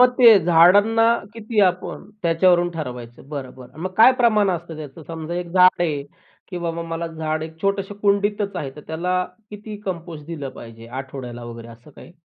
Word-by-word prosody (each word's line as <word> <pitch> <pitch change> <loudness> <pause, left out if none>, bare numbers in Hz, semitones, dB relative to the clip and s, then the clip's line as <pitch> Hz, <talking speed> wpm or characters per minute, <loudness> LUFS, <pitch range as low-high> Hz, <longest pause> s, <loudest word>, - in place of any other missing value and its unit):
मग 250 0 +7
ते 230 -4 +9
झाडांना 190 +7 +5 0.3
किती 220 -1 -1
आपण 180 +3 -4
त्याच्यावरून 175 +1 +3
ठरवायचं 125 -5 -8
बरं, 140 -4 -6
बरं. 130 +3 -14
मग 185 0 -3
काय 230 +4 +8
प्रमाण 215 -4 +4
असतं 170 -2 -5
त्याचं? 155 +1 -9
समजा 165 0 -6
एक 175 -1 -4
झाड 185 -1 +5
आहे, 150 -5 -1 0.5
की 180 - -5
बाबा 170 -1 -3
मला 165 0 -3
झाड 155 -1 -3
एक 160 0 -9
छोटसं 195 0 -1
कुंडीतच 205 0 +1
आहे. 135 -2 -4
तर - - -8
त्याला 180 +3 -1 0.3
किती 210 0 -8
कंपोस्ट 170 -5 -6
दिलं 150 -5 -5
पाहिजे 115 -2 -12
आठवड्याला 125 -3 -8
वगैरे 115 0 -9
असं 115 +6 -15
काही? 160 - -15
170 Hz, 175 wpm, -22 LUFS, 150-195 Hz, 0.5 s, ते